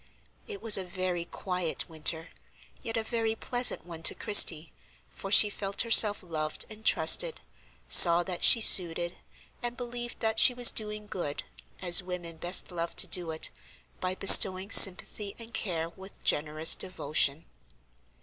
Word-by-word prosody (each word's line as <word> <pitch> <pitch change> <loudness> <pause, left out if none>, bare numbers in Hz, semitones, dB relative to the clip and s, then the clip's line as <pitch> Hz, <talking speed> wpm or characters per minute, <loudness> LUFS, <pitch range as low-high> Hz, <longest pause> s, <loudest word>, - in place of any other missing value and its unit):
It 200 - -13
was 215 -3 +2
a - - -8
very 180 -1 -8
quiet 180 -2 -7
winter, 160 0 -2 0.5
yet 225 0 -8
a 225 - -5
very 225 -1 -6
pleasant 245 -1 -2
one 165 -2 -14
to - - 0
Christie, 170 -6 +2 0.4
for 195 - -13
she 210 - +4
felt 200 0 -4
herself 220 -3 +3
loved 155 -3 -7
and 215 0 -16
trusted, - - +2 0.5
saw 170 0 +5
that 180 -1 -9
she 230 - +5
suited, 175 -3 +3 0.4
and 240 0 -9
believed 240 -1 -9
that 220 0 -4
she 245 +3 +3
was 245 -1 +4
doing 210 -1 -5
good, 175 -8 -9 0.4
as 175 +1 +2
women 180 -2 -11
best 175 +3 -3
love 170 -1 -9
to - - +2
do 175 -3 -2
it, 160 0 -7 0.5
by 185 0 -7
bestowing 190 +1 +5
sympathy 200 +1 +4
and 230 0 -15
care 165 -5 -7
with 190 +3 -19
generous 155 +2 0
devotion. 155 -4 -4
185 Hz, 150 wpm, -24 LUFS, 170-220 Hz, 0.5 s, saw